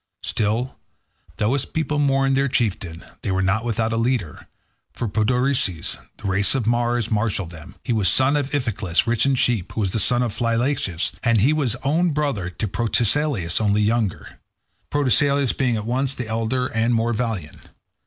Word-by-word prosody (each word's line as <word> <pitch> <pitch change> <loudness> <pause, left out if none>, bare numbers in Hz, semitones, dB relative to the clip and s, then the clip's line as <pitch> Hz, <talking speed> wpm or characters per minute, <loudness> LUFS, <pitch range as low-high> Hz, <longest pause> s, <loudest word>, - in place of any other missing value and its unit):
Still, 110 +5 -1 0.6
though 105 +4 +1
his 140 -1 -1
people 150 -2 -2
mourned 135 -1 +2
their 135 +1 +2
chieftain, 95 -10 -2 0.2
they - - -3
were 95 0 +1
not 95 +4 +1
without 115 -1 -1
a - - 0
leader, 115 - -2 0.5
for 120 - -3
Podarces, 110 - 0
of - - -21
the - - -6
race 95 +4 +2
of 130 -5 -1
Mars, 120 0 0
marshalled 105 -5 -1
them; 80 -3 -12
he - - -1
was 105 -4 +2
son 130 +2 +3
of 145 -2 -1
Iphiclus, 110 -11 0
rich 120 +2 +1
in 135 - +3
sheep, 120 -7 0
who 110 - -2
was 95 -3 0
the 110 - -1
son 120 +4 +4
of 115 -4 -2
Phylacus, 115 - 0
and 115 -4 +2
he 135 +8 +4
was 135 -7 0
own 165 +6 +2
brother 140 -11 -1
to 105 +4 -4
Protesilaus, 115 - +1
only 105 0 +2
younger, 110 -2 -1 0.5
Protesilaus 140 -1 +2
being 125 -3 +1
at 105 - -5
once 130 +3 0
the 125 - -5
elder 115 +3 -1
and 115 0 0
the - - +3
more 115 +1 +1
valiant. 110 - -3
115 Hz, 185 wpm, -22 LUFS, 105-130 Hz, 0.6 s, son